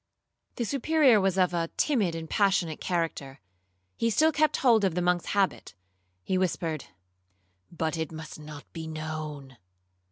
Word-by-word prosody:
The 235 - -2
Superior 275 -3 +4
was 190 -1 +1
of 180 -1 +3
a 165 -1 -1
timid 210 - +1
and 165 -1 -5
passionate 190 -4 +1
character. 160 -6 -2 0.6
He 230 - +1
still 310 +8 +4
kept 310 0 +2
hold 230 -5 +4
of 185 -4 +1
the 180 - 0
monk's 180 -1 +1
habit;—he 95 - -3
whispered, 165 -4 -1 0.9
'But 160 -1 -2
it 160 -1 -3
must 160 -1 -8
not 150 -1 -9
be 160 -1 -6
known.' 155 -4 -6
170 Hz, 140 wpm, -28 LUFS, 155-200 Hz, 0.9 s, Superior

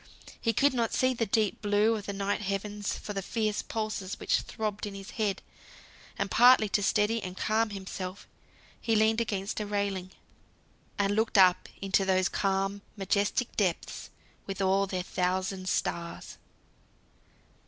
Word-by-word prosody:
He 230 - +2
could 280 +6 +3
not 235 -3 0
see 255 0 +3
the 230 -2 -1
deep 215 0 +1
blue 205 +2 +3
of 210 -2 -6
the - - -1
night 200 +1 -1
heavens 205 +1 -3
for 210 - -6
the 195 - -2
fierce 215 +1 -1
pulses 215 -3 -4
which - - +1
throbbed 210 -1 -4
in 200 - -7
his 195 -1 -8
head. 205 -4 -1 0.7
And - - -2
partly 245 -2 +7
to 205 - +1
steady 215 +2 +2
and 185 -1 -7
calm 220 +1 +1
himself, 190 -1 -6 0.5
he 225 -1 +1
leaned 220 +1 +3
against 205 -2 -2
a 210 - -2
railing, 200 -3 -2 0.9
and 205 -1 +1
looked 220 0 +1
up 185 -1 +5
into 195 0 +2
those 185 -1 +2
calm 195 0 0 0.2
majestic 200 +4 0
depths 185 -5 -1 0.4
with 195 0 -5
all 195 +1 +2
their 185 -1 -2
thousand 185 +1 -1
stars. 170 -1 -3
200 Hz, 155 wpm, -29 LUFS, 195-215 Hz, 0.9 s, partly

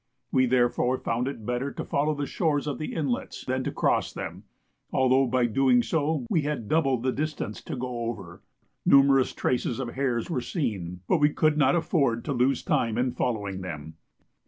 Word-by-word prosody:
We 130 -1 +3
therefore 125 0 +2
found 120 +1 -1
it 115 -6 -6
better 125 +4 -2
to - - -5
follow 150 +2 0
the 145 0 -2
shores 145 -1 0
of 145 - -3
the 155 - -4
inlets 140 -7 -3
than 130 0 -1
to - - -1
cross - - +1
them, - - -7 0.5
although 130 +1 +3
by 125 0 +2
doing 125 +1 +3
so 155 -4 0
we 160 - +2
had 145 -7 -3
double 135 -3 +2
the 130 +2 0
distance 150 -7 -3
to - - -4
go 125 -2 -4
over. 95 -7 -8 0.4
Numerous 135 -1 +5
traces 125 -1 -1
of 130 -3 -3
hares 125 -3 -1
were 135 -7 -2
seen, 95 - -3
but - - +3
we 150 - +5
could 155 0 +2
not 145 -1 +4
afford 140 -9 +1
to 145 - -1
lose 130 +1 +1
time 115 -1 +1
in 125 +1 +1
following 100 -7 -2
them. 80 -3 -7
130 Hz, 185 wpm, -27 LUFS, 120-145 Hz, 0.5 s, Numerous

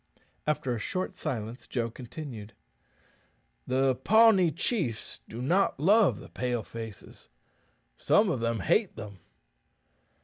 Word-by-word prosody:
After 140 -4 0
a 115 - -3
short 185 - -3
silence 120 -5 -5
Joe 115 -2 -2
continued, 120 -3 -8 1.1
"The 130 +1 +2
Pawnee 195 - +5
chiefs 155 - -2
do 120 +3 -6
not 175 +2 +2
love 200 +6 +4
the - - -12
Pale 125 -3 -2
faces. 115 -4 -10 0.7
Some 205 -2 +3
of 130 - -1
them 115 -2 -1
hate 195 - +2
them." 100 -3 -9
130 Hz, 115 wpm, -29 LUFS, 115-180 Hz, 1.1 s, Pawnee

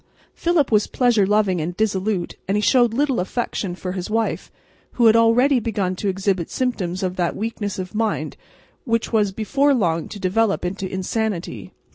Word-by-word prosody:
Philip 335 -7 +1
was 210 -1 +3
pleasure 235 -6 +2
loving 205 -4 +2
and 175 +3 -4
dissolute, 200 -3 -1
and 195 +2 +1
he - - +1
showed 240 +2 +4
little 270 +1 +1
affection 190 -1 -3
for 180 0 -5
his 180 0 -5
wife, 225 +1 -1 0.4
who 240 - +2
had 220 0 +7
already 245 +4 +4
begun 205 -5 -2
to 205 - -3
exhibit 190 -2 -1
symptoms 195 -8 -2
of 185 0 -2
that 175 -2 0
weakness 210 -2 -4
of 185 +1 -6
mind 220 0 -1 0.5
which 230 -1 -1
was 210 -3 +2
before 275 +8 +1
long 165 -8 0
to 205 - -8
develop 200 +1 +1
into 190 +1 -4
insanity. 190 0 -3
210 Hz, 170 wpm, -21 LUFS, 185-230 Hz, 0.5 s, had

